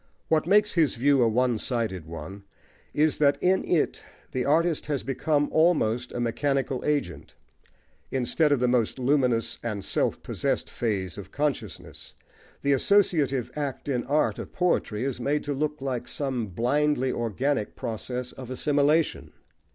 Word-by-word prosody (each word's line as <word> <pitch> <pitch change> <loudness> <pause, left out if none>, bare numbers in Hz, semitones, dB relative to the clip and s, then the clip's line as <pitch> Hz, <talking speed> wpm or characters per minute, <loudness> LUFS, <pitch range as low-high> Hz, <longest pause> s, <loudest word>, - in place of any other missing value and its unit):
What 160 0 +2
makes 210 +2 +4
his 160 -7 +2
view 140 +2 +3
a 120 - +5
one 120 0 +1
sided 110 - -2
one 85 +5 -8 0.5
is, 155 +1 +1
that 145 -1 +4
in 185 +1 +2
it 170 -4 0 0.3
the 130 -3 -1
artist 160 +2 +2
has 145 -2 -1
become 145 +2 0
almost 125 -8 +2
a - - -4
mechanical 130 +2 -1
agent: 95 - -2 0.7
instead 135 +4 +1
of 145 - +3
the 125 - +2
most 120 -1 +1
luminous 125 -3 +1
and 105 -4 -4
self - - 0
possessed - - -2
phase 100 -5 -2
of 95 -1 -10
consciousness, 145 -1 -4 0.5
the 140 0 +3
associative 140 - +2
act 145 -3 -4
in 125 -4 0
art 145 +4 +1
or - - -5
poetry 150 -11 0
is 135 -2 -2
made 145 +4 0
to 145 - -2
look 150 0 -2
like 130 -3 -3
some 130 -6 -2
blindly 130 +6 +1
organic 120 +1 -1
process 125 +2 -4
of 130 -2 -10
assimilation. 145 +4 +1
135 Hz, 150 wpm, -26 LUFS, 120-150 Hz, 0.7 s, a